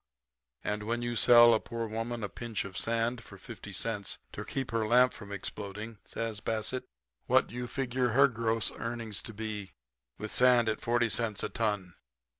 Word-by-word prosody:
"'And 105 0 -1
when 115 +3 -2
you 120 0 -2
sell 120 0 +8
a 110 - +3
poor 115 0 -4
woman 115 +1 -3
a - - 0
pinch 115 0 -4
of 95 -2 -9
sand 115 +1 0
for 100 - -12
fifty 105 +1 -10
cents 100 +1 -2
to - - -6
keep 135 -3 -4
her 115 -1 0
lamp 125 +2 +5
from 100 -2 -10
exploding,' 105 +2 -6
says 115 -2 -4
Bassett, 110 +4 -1 0.4
'what - - +5
do - - -14
you 125 0 -4
figure 125 0 0
her 135 +4 +5
gross 115 -2 0
earnings 115 -3 -4
to - - -8
be, 105 -3 -5 0.4
with 110 0 -5
sand 125 -2 +5
at 110 - -2
forty 120 0 +2
cents 110 -1 -1
a - - -1
ton?' 105 -6 -1
115 Hz, 185 wpm, -31 LUFS, 105-120 Hz, 0.4 s, sell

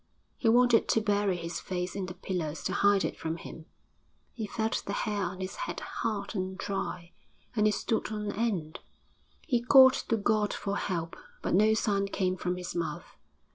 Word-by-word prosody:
He 230 - +1
wanted 240 0 +5
to - - +3
bury 205 -3 +1
his 170 0 -4
face 180 0 -4
in 195 -2 -3
the 180 - -7
pillows 165 -5 -3
to 185 - -1
hide 200 -1 +4
it - - -4
from 160 +1 -3
him; 165 -1 -10 0.7
he 220 -3 -4
felt 220 +1 -1
the 200 - -2
hair 210 -1 -1
on 185 +1 -5
his 185 - -4
head - - -4
hard 205 -2 -3
and 190 -2 -3
dry, 180 -3 -4 0.4
and 210 -1 +4
it 210 - +2
stood 220 +1 -1
on 210 -1 -3
end! 200 -9 -2 0.7
He 245 -6 +1
called 260 +1 +8
to 230 - -1
God 210 0 +1
for 200 0 -3
help, 170 -4 -3 0.3
but - - -1
no 215 +4 +5
sound 200 -2 0
came 185 -2 0
from 180 -1 -2
his 180 0 -5
mouth. 170 -2 -4
200 Hz, 185 wpm, -29 LUFS, 180-220 Hz, 0.7 s, called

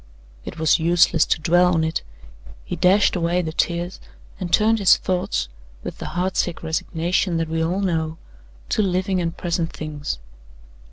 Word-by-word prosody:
It - - -7
was 160 +1 +3
useless 170 0 +3
to - - +1
dwell 175 +3 +3
on 160 - +2
it; 160 0 -1 0.6
he - - -4
dashed 195 +3 +4
away 175 +1 +1
the 160 - -3
tears, 175 +2 -1 0.4
and 180 -2 -4
turned 220 +4 +4
his 195 - +6
thoughts, 180 - -1 0.4
with - - -7
the - - -5
heart 185 +1 0
sick 175 -2 -1
resignation 165 +2 -1
that 165 0 -1
we 160 0 0
all 180 +4 -1
know, 160 -4 -1 0.5
to - - +1
living 185 -1 0
and 165 -1 -3
present 170 -1 -2
things. 150 - -5
170 Hz, 165 wpm, -22 LUFS, 160-185 Hz, 0.6 s, his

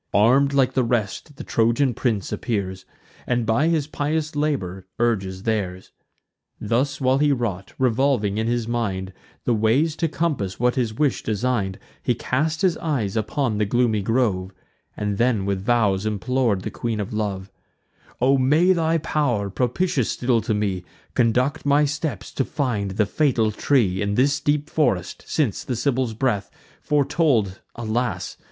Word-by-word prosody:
Arm'd 130 +7 +5
like 135 -2 +2
the 130 - +2
rest 120 +5 -2
the 150 - -8
Trojan 120 +3 +2
prince 110 -5 -1
appears, 95 -5 -3 0.4
And 120 -2 +1
by 115 +8 +2
his 160 -4 +1
pious 150 +1 -2
labour 95 -12 -2
urges 95 -5 0
theirs. 95 -5 -2 0.7
Thus 120 +6 0
while 130 0 +2
he 145 0 +3
wrought, 105 -7 -2
revolving 125 -4 +1
in 110 - 0
his 120 -1 0
mind 95 -6 -2 0.3
The 120 - +2
ways 120 +9 +2
to 165 - +1
compass 145 - -2
what 125 +1 +3
his 120 -4 0
wish 140 +4 0
design'd, 105 -3 -1 0.2
He 125 - +1
cast 155 - -1
his 180 -4 +3
eyes 125 -12 -2
upon 110 0 -1
the 105 - +2
gloomy 110 0 +1
grove, 100 -4 0 0.5
And 105 -1 -2
then 115 -5 +2
with 100 -1 -1
vows 100 -3 +2
implor'd 110 -1 0
the - - -4
Queen 115 -2 -3
of 105 +1 -4
Love: 100 -3 -3 0.7
"O 135 +2 +4
may 155 +8 +4
thy 165 -1 +1
pow'r, 125 -11 0
propitious 130 - 0
still 120 -2 +1
to 110 -2 -1
me, 100 -4 -1 0.3
Conduct 125 +6 +1
my 145 +1 +4
steps 145 - -3
to 135 - 0
find 120 -9 -2
the 105 - +4
fatal 115 -2 +1
tree, 105 -5 +1
In 100 0 0
this 140 +4 +3
deep 145 0 0
forest; 95 - 0
since 135 -11 0
the 125 - -3
Sibyl's 125 -1 0
breath 110 -5 0 0.3
Foretold, 140 - +1
alas! 120 +1 -2
120 Hz, 155 wpm, -23 LUFS, 105-140 Hz, 0.7 s, Arm'd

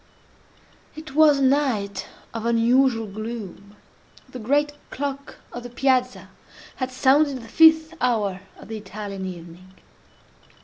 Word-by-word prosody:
It 310 -2 -10
was 300 -1 +5
a 275 - 0
night 260 -8 0 0.3
of 230 -1 -5
unusual 235 0 +3
gloom. 210 -1 -8 0.5
The 255 - -9
great 290 +6 +1 0.2
clock 280 0 -5 0.2
of 245 - -6
the 245 - -9
Piazza 255 0 0 0.5
had 255 -1 -2
sounded 275 +2 +3
the - - -11
fifth 320 +4 +5
hour 210 -7 0 0.2
of - - -13
the 220 - -5
Italian 200 -1 -7
evening. 180 +1 -11
245 Hz, 125 wpm, -23 LUFS, 210-275 Hz, 0.5 s, was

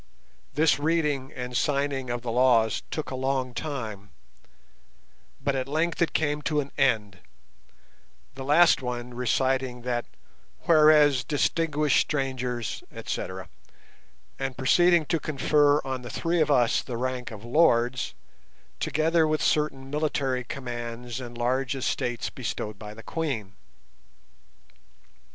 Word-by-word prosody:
This 155 -1 +3
reading 150 -4 0
and 125 0 -6
signing 140 0 0
of 120 0 -3
the 120 - -3
laws 115 -3 +3
took 155 - -4
a - - -3
long 130 -1 -1
time, 110 -9 -5 1.3
but 140 0 -1
at 130 0 -2
length 160 +5 -1
it 170 - +2
came 150 -1 0
to 150 0 0
an 140 -1 -4
end, 110 -8 +1 1.1
the 135 0 -7
last 155 +4 +5
one 125 -1 -5
reciting 125 0 0
that 120 -1 -1 0.6
"whereas 150 -4 +5
distinguished 150 +2 +1
strangers, 130 -5 -2
etc.", 95 0 -5 0.9
and 135 -2 -3
proceeding 170 +5 +4
to 165 +2 0
confer 145 0 +3
on 130 -1 -3
the 120 - -8
three 165 +5 0
of 150 - +2
us 125 -5 +3
the 120 -3 -6
rank 125 0 -3
of 110 0 -10
"lords", 125 -3 +2 0.6
together 160 +2 +2
with 155 0 0
certain 135 -3 0
military 140 -4 -1
commands 120 -1 -6
and 120 -1 -8
large 130 +2 0
estates 120 -3 -2
bestowed 105 -1 -5
by 105 -1 -9
the 115 - -11
Queen. 130 -12 -3
130 Hz, 125 wpm, -26 LUFS, 120-150 Hz, 1.3 s, last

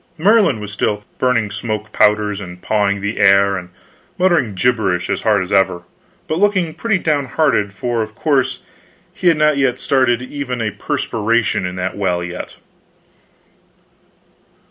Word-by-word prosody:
Merlin 195 - +3
was 105 -1 -7
still 105 0 -1 0.2
burning 115 -5 +1
smoke 110 0 -4
powders, 105 -1 +2
and 90 -2 -9
pawing 100 0 0
the 100 +2 -3
air, 100 0 +5
and 90 -2 -6 0.5
muttering 170 - +2
gibberish 95 -5 0
as - - -1
hard 105 -3 +2
as 90 - -9
ever, 95 -3 +2 0.4
but 155 - -1
looking 185 -5 +1
pretty 220 +1 0
down 150 -5 0
hearted, 115 -7 +1
for 120 +3 -2
of 110 0 -6
course 135 -2 0 0.5
he 180 - -2
had 165 -3 +5
not 140 -4 +2
started 130 -3 +1
even 125 -2 -5
a 110 -2 -1
perspiration 110 -3 -1
in 90 - -6
that 90 0 -3
well 90 -3 -1
yet. 90 +1 -7
110 Hz, 145 wpm, -18 LUFS, 100-140 Hz, 0.5 s, air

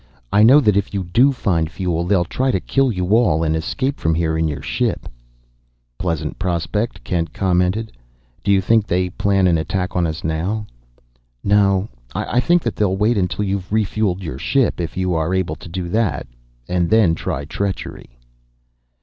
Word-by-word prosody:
I 105 - +5
know 125 +7 +8
that 105 -6 +3
if 100 0 -1
you 95 - -1
do 120 +11 +3
find 85 -11 0
fuel, 85 -2 -2
they'll 90 -1 +2
try 130 +9 -1
to 95 - +1
kill 135 +6 +1
you 90 -3 -2
all 90 -9 +3
and 80 0 +1
escape 130 - -2
from 80 0 +1
here 80 -1 0
in 80 0 +1
your 75 -2 -5
ship." - - -1 0.9
"Pleasant 85 -4 -3
prospect," 90 +6 -2
Kent 85 -2 -2
commented. 95 +4 0 0.5
"Do - - -2
you 95 -1 +4
think 110 +2 +2
they 90 0 0
plan 95 0 +1
an 85 -3 +3
attack 90 +3 -2
on 90 -2 +2
us 80 +1 -5
now?" 90 +7 -2 0.8
"No; 100 -1 +3 0.3
I 120 - 0
think 175 +6 +3
that 115 - -2
they'll 95 -2 +1
wait 110 +4 +2
until 100 +1 -1
you've 95 -2 -3
refueled 105 -3 0
your 80 - -5
ship, 135 -9 +1
if 85 +1 -5
you 90 -1 0
are 80 +3 0
able 90 -4 -1
to - - -11
do 90 +1 -4
that, 110 0 0 0.4
and 90 -1 0
then 110 -6 +4
try 75 -3 -3
treachery." 90 -8 -5
95 Hz, 180 wpm, -20 LUFS, 85-105 Hz, 0.9 s, know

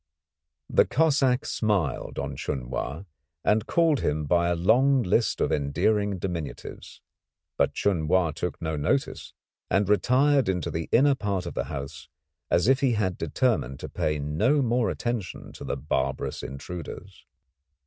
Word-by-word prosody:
The - - +3
Cossack 140 -4 +2
smiled 100 - -1
on 70 -1 -3
Chun 65 -2 -4
Wa 70 +7 -4 0.4
and 110 +1 +2
called 165 -5 +3
him 75 +1 -1
by 85 +3 +2
a 85 - +1
long 125 +9 +3
list 105 +5 +1
of - - +1
endearing 100 +8 +1
diminutives, 85 -5 -6 0.5
but - - +1
Chun 85 -6 0
Wa 90 -1 +3
took 90 +3 -4
no 80 -1 -2
notice, 75 - -1 0.3
and 100 0 +2
retired 130 +6 +3
into 90 -4 -1
the 80 0 -4
inner 140 +4 +5
part 100 -7 -2
of 85 - -5
the - - -2
house 70 -1 -7 0.4
as 85 - +2
if 135 0 +4
he 135 -3 +2
had 95 -5 0
determined 70 - -1
to - - -6
pay 75 0 -1
no 105 - +1
more 120 -1 +1
attention 120 -6 -4
to - - -10
the - - -3
barbarous 65 -1 -2
intruders. 90 +6 -8
95 Hz, 150 wpm, -26 LUFS, 75-120 Hz, 0.5 s, inner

